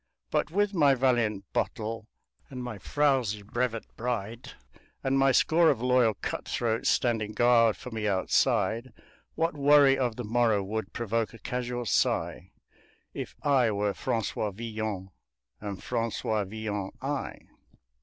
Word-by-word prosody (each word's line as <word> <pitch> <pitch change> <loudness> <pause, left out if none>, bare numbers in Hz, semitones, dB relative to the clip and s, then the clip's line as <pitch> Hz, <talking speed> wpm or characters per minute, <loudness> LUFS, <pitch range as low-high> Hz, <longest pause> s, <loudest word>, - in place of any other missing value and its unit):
But, - - +1
with 205 +4 +1
my 145 -6 +4
valiant 120 -6 +1
bottle 110 0 -2 0.4
and 125 -2 -6
my 120 -5 -6
frouzy 130 -6 +1
brevet 115 +1 -2
bride, 115 -1 -4 0.5
And 135 0 +1
my 135 0 +5
score 165 +5 +4
of 130 - +1
loyal 125 -3 +3
cut - - -5
throats 115 -1 0
standing 110 -3 +1
guard 115 -2 +4
for 125 - -9
me 110 -2 -2
outside, 110 +4 +1 0.4
What 165 +1 0
worry 140 -2 +5
of 120 -4 0
the 125 - -5
morrow 110 -2 +2
would 105 0 -4
provoke 115 0 -2
a - - -10
casual 125 0 -4
sigh - - 0 0.6
If - - -6
I 135 -5 +3
were 105 -1 0
Francois 110 0 -2
Villon 110 -2 -5 0.5
and 100 -3 -6
Francois 110 -2 -1
Villon 105 -1 -4
I? 140 +1 -3
115 Hz, 135 wpm, -28 LUFS, 110-130 Hz, 0.6 s, my